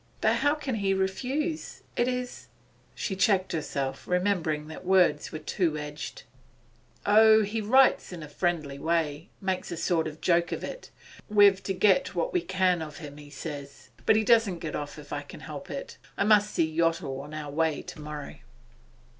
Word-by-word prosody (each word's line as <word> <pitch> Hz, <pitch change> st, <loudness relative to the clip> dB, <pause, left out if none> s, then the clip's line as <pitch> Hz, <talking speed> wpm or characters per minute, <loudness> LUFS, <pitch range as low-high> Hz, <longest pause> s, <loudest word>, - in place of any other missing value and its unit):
'But -, -, +3 dB
how 290 Hz, +1 st, +2 dB
can 285 Hz, -4 st, -4 dB
he 195 Hz, -2 st, +1 dB
refuse? 270 Hz, -, -2 dB
It 240 Hz, -, +2 dB
is 250 Hz, -1 st, -4 dB, 0.2 s
' -, -, -34 dB
She 195 Hz, -, -3 dB
checked 190 Hz, -1 st, +2 dB
herself, 140 Hz, -4 st, -3 dB
remembering 180 Hz, -5 st, 0 dB
that 160 Hz, -, -9 dB
words 180 Hz, -5 st, +3 dB
were -, -, -4 dB
two 160 Hz, 0 st, -1 dB
edged. 150 Hz, -, -6 dB, 0.8 s
'Oh, 220 Hz, +1 st, +7 dB
he 215 Hz, +2 st, -2 dB
writes 260 Hz, +3 st, +4 dB
in 175 Hz, -2 st, -7 dB
quite 150 Hz, -1 st, -9 dB
a -, -, -21 dB
friendly 155 Hz, -6 st, -1 dB
way 160 Hz, -1 st, -1 dB
makes 190 Hz, -2 st, -2 dB
a 170 Hz, -, -4 dB
sort 160 Hz, -1 st, +1 dB
of 155 Hz, 0 st, -8 dB
joke 170 Hz, 0 st, +2 dB
of -, -, -3 dB
it. -, -, -7 dB, 0.4 s
We've 205 Hz, -2 st, +6 dB
to 195 Hz, -, -2 dB
get 210 Hz, +8 st, +3 dB
what -, -, -1 dB
we 360 Hz, -, +2 dB
can 185 Hz, -, +1 dB
of 155 Hz, -2 st, -7 dB
him, 145 Hz, -3 st, -9 dB
he 145 Hz, -1 st, -12 dB
says. 140 Hz, -3 st, -8 dB, 0.2 s
But -, -, +6 dB
he 220 Hz, -, +3 dB
doesn't 225 Hz, -5 st, +4 dB
get 160 Hz, -2 st, -5 dB
off 145 Hz, -1 st, -5 dB
if -, -, -9 dB
I -, -, -2 dB
can -, -, -12 dB
help -, -, -8 dB
it. -, -, -7 dB, 0.2 s
I -, -, +2 dB
must 210 Hz, 0 st, +5 dB
see 165 Hz, -, +2 dB
Yottle 165 Hz, -5 st, 0 dB
on 150 Hz, +2 st, -9 dB
our 150 Hz, -2 st, -5 dB
way 160 Hz, 0 st, 0 dB
tomorrow. 150 Hz, -1 st, -8 dB
180 Hz, 190 wpm, -28 LUFS, 150-210 Hz, 0.8 s, Oh